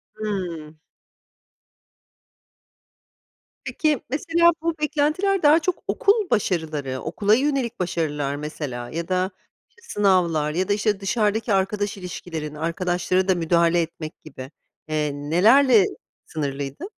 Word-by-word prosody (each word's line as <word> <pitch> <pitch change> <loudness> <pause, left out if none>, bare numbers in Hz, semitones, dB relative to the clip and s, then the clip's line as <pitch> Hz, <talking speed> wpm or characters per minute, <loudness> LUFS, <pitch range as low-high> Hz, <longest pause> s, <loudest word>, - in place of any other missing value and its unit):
Hıı. 180 -8 -4 2.9
Peki, 305 -5 0
mesela 335 +5 +3
bu 335 0 0
beklentiler 320 +6 +1
daha 305 +3 +6
çok 365 +1 -2
okul 410 -2 +2
başarıları, 155 - -1
okula 210 0 +2
yönelik 265 -3 -1
başarılar 150 -5 -2
mesela 145 -5 -5
ya 165 +3 -4
da, 185 +1 0 0.4
işte, 465 - -26
sınavlar 180 - +1
ya 180 +4 -1
da, 205 - +2
işte, 210 -1 0
dışarıdaki 210 +2 0
arkadaş 200 +1 0
ilişkilerin, 165 -4 -6
arkadaşlara 175 +3 0
da 190 - +3
müdahale 170 0 +2
etmek 160 -1 -7
gibi, 130 -3 -10 0.4
eee, 155 -1 -1
nelerle 205 - +4 0.4
sınırlıydı? 140 -2 -4
185 Hz, 110 wpm, -23 LUFS, 155-230 Hz, 2.9 s, daha